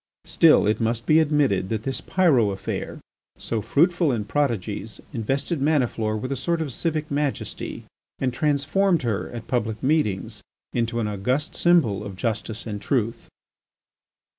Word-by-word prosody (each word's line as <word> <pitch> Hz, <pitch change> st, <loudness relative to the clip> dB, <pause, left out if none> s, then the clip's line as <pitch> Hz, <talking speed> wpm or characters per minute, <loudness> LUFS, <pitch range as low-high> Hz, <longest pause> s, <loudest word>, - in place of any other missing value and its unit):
Still, -, -, +5 dB
it 105 Hz, +3 st, +1 dB
must 115 Hz, +1 st, 0 dB
be 155 Hz, +1 st, +5 dB
admitted 145 Hz, -12 st, +2 dB
that 110 Hz, -1 st, -2 dB
this 135 Hz, +1 st, -3 dB
Pyrot 140 Hz, -, +3 dB
affair, 95 Hz, -, -4 dB, 0.4 s
so 115 Hz, -2 st, -3 dB
fruitful 170 Hz, -, +2 dB
in 110 Hz, -4 st, -2 dB
prodigies, 110 Hz, -5 st, -2 dB
invested 135 Hz, +6 st, -1 dB
Maniflore 125 Hz, -7 st, +1 dB
with 130 Hz, +5 st, -4 dB
a -, -, 0 dB
sort 170 Hz, +6 st, -1 dB
of 150 Hz, -6 st, -3 dB
civic 155 Hz, 0 st, -2 dB
majesty, 145 Hz, -1 st, -3 dB, 0.3 s
and 130 Hz, -2 st, -1 dB
transformed 150 Hz, +5 st, +1 dB
her, 115 Hz, -5 st, -1 dB
at 115 Hz, -1 st, -7 dB
public 110 Hz, -3 st, -2 dB
meetings, 130 Hz, -10 st, 0 dB, 0.3 s
into 115 Hz, 0 st, 0 dB
an 110 Hz, -, -1 dB
august 125 Hz, -, -1 dB
symbol 150 Hz, -, +3 dB
of 100 Hz, -2 st, -7 dB
justice 110 Hz, +1 st, -3 dB
and 105 Hz, -3 st, -5 dB
truth. 115 Hz, -1 st, -1 dB
125 Hz, 145 wpm, -24 LUFS, 110-150 Hz, 0.4 s, Still